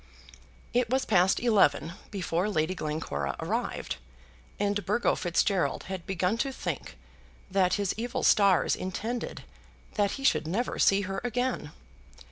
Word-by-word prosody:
It 245 -1 +2
was 260 +1 +1
past 185 -2 +4
eleven 195 -8 +3 0.2
before 185 -1 -1
Lady 160 -2 0
Glencora 150 - -3
arrived, - - -2 0.6
and 205 0 0
Burgo 210 +6 +2
Fitzgerald 180 +1 +1
had 190 -2 -6
begun 190 +4 0
to 270 +1 0
think - - -5 0.5
that 185 -1 +3
his 200 -3 0
evil 235 +2 -3
stars 200 -3 +4
intended 220 +6 -4 0.5
that 205 -2 +1
he 275 - -6
should 215 - +3
never 220 +9 -1
see 195 0 +5
her 195 0 -3
again. 245 -9 -1
195 Hz, 130 wpm, -28 LUFS, 175-225 Hz, 0.6 s, see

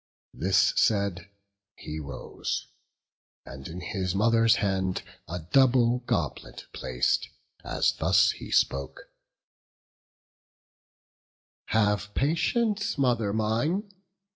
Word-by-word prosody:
This 95 +2 +2
said, 100 -3 +1 0.5
he 75 +1 -7
rose, 70 -2 -5 0.8
and 65 0 -9
in 90 +3 -7
his 95 0 -3
mother's 115 +2 +4
hand 95 -2 -1 0.2
A 85 - -4
double 125 +7 +3
goblet - - -3
plac'd, 60 -1 0 0.4
as - - +1
thus - - +3
he - - -9
spoke: 70 0 0 2.6
"Have 105 -1 0
patience, 200 - 0
mother 120 -6 +1
mine! 120 - -1
105 Hz, 90 wpm, -27 LUFS, 90-120 Hz, 2.6 s, mother's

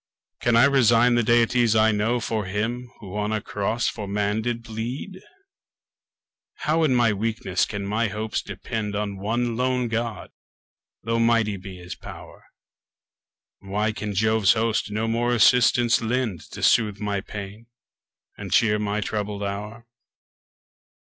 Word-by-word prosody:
Can 120 -1 +2
I 115 - +6
resign 120 -3 +4
the 120 - +3
deities 120 0 +3
I 110 0 +5
know 110 +4 0
For 110 -2 -2
him 115 +6 -3
who 100 -2 -9
on 105 0 -1
a 110 - 0
cross 105 +3 -2
for 105 - -4
man 105 +2 -1
did 115 0 -3
bleed? 120 - -6 1.4
How 160 +2 +2
in 135 -5 +3
my 120 -3 +3
weakness 105 -3 -1
can 100 -2 -5
my 110 +3 0
hopes 105 +1 -3
depend 105 +1 -5
On 100 -1 -3
one 115 +3 -1
lone 125 0 0
God, 115 0 -3 0.7
though 115 +1 0
mighty 115 -3 +2
be 95 -1 -9
his 90 +1 -8
pow'r? - - -12 1.1
Why 105 +3 -1
can 105 -1 -5
Jove's 110 -1 +3
host 115 -1 0
no 110 +2 -2
more 120 +2 0
assistance 120 +1 +4
lend, 115 -6 -2
To - - -8
soothe 105 -3 +3
my 100 -1 -2
pains, 105 +3 -8 0.7
and - - -7
cheer 105 -2 +3
my 105 0 -1
troubled 105 -1 -3
hour? 105 +4 -5
110 Hz, 145 wpm, -24 LUFS, 105-120 Hz, 1.4 s, I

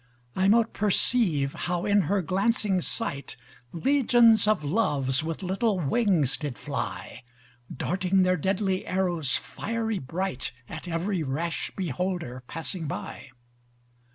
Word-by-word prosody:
I 190 +1 +2
mote 225 +2 +4
perceive 195 - +2
how 175 0 -2
in 205 0 +4
her 200 -1 +2
glancing 195 +1 +1
sight, 140 -9 -4 0.4
Legions 235 -1 +4
of 210 -7 +2
loves 145 - +1
with 165 +3 -4
little 195 +2 0
wings 170 - +2
did 145 -6 -5
fly: - - -5 0.5
Darting 185 +5 +1
their 185 0 +3
deadly 190 +2 -1
arrows 175 -7 +1
fiery 225 -2 -3
bright, 140 -1 -3
At 160 - -8
every 175 +2 -1
rash 160 +4 -2
beholder 175 -6 -3
passing 165 +1 -4
by. 140 - -6
185 Hz, 120 wpm, -27 LUFS, 160-205 Hz, 0.5 s, mote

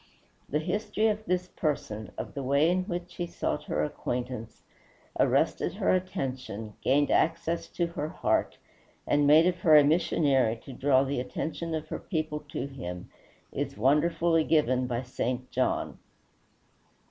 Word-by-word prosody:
The 150 - +1
history 210 +6 0
of 215 0 -2
this 180 0 0
person, 110 -9 -3
of - - -5
the 140 - -4
way 140 +5 +3
in 185 0 0
which 175 -2 -5
he 175 - -2
sought - - -3
her - - -1
acquaintance, 120 -2 -4 0.6
arrested - - +2
her - - +1
attention, 130 - -3
gained 145 +2 +2
access 165 +1 +1
to 175 - -1
her 160 -2 -4
heart, - - 0 0.5
and 145 0 +3
made 155 +3 +7
of 180 -1 +1
her 160 -3 +6
a 150 - +8
missionary 140 -6 +2
to 135 - -8
draw 135 +1 +3
the 140 -1 -2
attention 160 +6 -3
of 155 0 -5
her - - -4
people 155 -4 -3
to - - -3
him, 90 -11 -7 0.4
is - - -4
wonderfully 160 +6 +3
given 130 -6 +2
by 120 0 -2
St. 125 0 -3
John. - - -1
150 Hz, 150 wpm, -28 LUFS, 130-170 Hz, 0.6 s, a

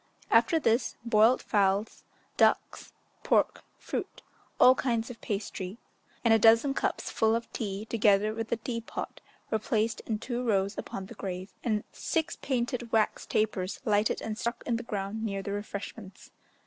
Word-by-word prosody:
After 330 - +5
this, 235 -3 +1
boiled 230 +2 +4
fowls, 200 0 +1 0.3
ducks, - - +2 0.3
pork, - - +2 0.2
fruit, - - -5 0.4
all 255 - +9
kinds 240 -2 -1
of 235 - -12
pastry, 195 -1 -4 0.5
and 230 - +6
a 225 - +5
dozen 230 +5 +5
cups - - -2
full 220 0 +2
of 230 0 -4
tea, 205 -1 -3
together 215 -2 +3
with 225 0 -4
the 235 - 0
tea 230 +1 -4
pot, 230 - -6 0.3
were 220 - +2
placed 220 0 0
in 220 - 0
two 240 +2 -3
rows 200 -3 +1
upon 195 - -5
the - - -10
grave, 185 0 -6
and 215 -3 0
six 325 -3 -1
painted 245 -2 -2
wax 220 -1 +1
tapers 200 -3 -1
lighted 210 -1 +2
and 215 0 -4
stuck 235 0 -3
in 235 - 0
the - - -4
ground 210 -1 -4
near 195 -3 -2
the 200 - -4
refreshments. 200 -1 -7
220 Hz, 160 wpm, -29 LUFS, 200-235 Hz, 0.5 s, all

